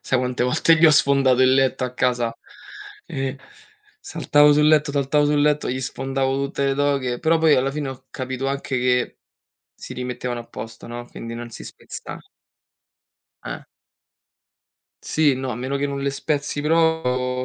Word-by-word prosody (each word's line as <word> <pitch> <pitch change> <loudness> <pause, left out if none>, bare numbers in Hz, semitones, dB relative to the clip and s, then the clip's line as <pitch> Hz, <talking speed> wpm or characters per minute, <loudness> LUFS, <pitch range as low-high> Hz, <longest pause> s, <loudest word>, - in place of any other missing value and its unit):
sai 130 - 0
quante 125 -1 -1
volte 160 +5 +3
gli 165 - +4
ho 155 - +8
sfondato 135 -3 +4
il 130 0 +5
letto 135 -1 +1
a 125 - -4
casa? 120 -2 0 0.7
E, 135 0 -4 0.6
saltavo 145 0 +3
sul 150 +1 +4
letto, 150 -2 +3
saltavo 145 +1 +2
sul 145 0 +2
letto, 150 -2 +1
gli 130 +1 -3
sfondavo 135 +1 -2
tutte 140 0 -2
le 135 - +1
doghe. 140 -4 0
Però, 165 +1 +3
poi, 160 -2 +5
alla 135 +2 +1
fine, 145 -1 -4
ho 130 -1 -9
capito 130 +1 -4
anche 140 -1 -3
che 125 0 0 0.6
si - - -10
rimettevano 125 -1 -4
a - - -17
posto, 115 +1 -9
no, 120 +1 -7
quindi 115 0 -8
non 120 0 -7
si - - -10
spezza - - -9 1.3
Eh. - - -5 1.5
Sì, 150 -3 +2
no, 130 0 -4
a - - -4
meno 130 +3 -3
che 145 +1 -1
non 140 0 -4
le 140 0 0
spezzi 145 +1 -2
pro 135 -6 +1
135 Hz, 170 wpm, -22 LUFS, 125-145 Hz, 1.5 s, ho